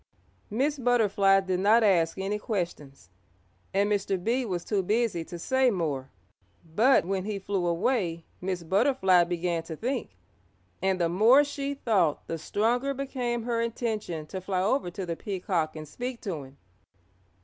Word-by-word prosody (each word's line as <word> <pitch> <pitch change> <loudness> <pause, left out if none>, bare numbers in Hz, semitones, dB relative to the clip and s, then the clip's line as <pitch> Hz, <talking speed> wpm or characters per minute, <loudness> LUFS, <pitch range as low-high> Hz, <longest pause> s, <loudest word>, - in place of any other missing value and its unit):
Miss 280 +6 0
Butterfly 205 -5 +3
did 185 -1 -1
not 215 +4 +5
ask 175 -5 +3
any 195 +2 -2
questions, 150 - -5 0.6
and 200 +1 +2
Mr. 200 -2 0
Bee 245 +4 +1
was 180 -5 -3
too 205 -3 +1
busy 210 -3 0
to 175 - -8
say 260 +8 +2
more. 150 - -2 0.6
But 215 +8 +3
when 190 0 -2
he 210 -1 -2
flew 195 -2 -2
away 175 -2 0 0.2
Miss 180 -1 -3
Butterfly 190 - +3
began 175 -1 -1
to 165 0 -7
think, 240 - -3 0.7
and 190 0 +1
the 170 - +2
more 220 +11 +5
she 285 -1 -4
thought 195 - +1
the 165 - -4
stronger 240 - 0
became 250 -3 -2
her 230 -1 -1
intention 215 -8 -3
to 185 +5 -6
fly 185 0 -1
over 215 -1 +1
to 185 +2 -5
the 170 -1 -3
Peacock 180 -5 -2
and 155 -1 -7
speak 245 - -5
to 165 -9 -4
him. 135 +1 -17
195 Hz, 160 wpm, -27 LUFS, 175-235 Hz, 0.7 s, not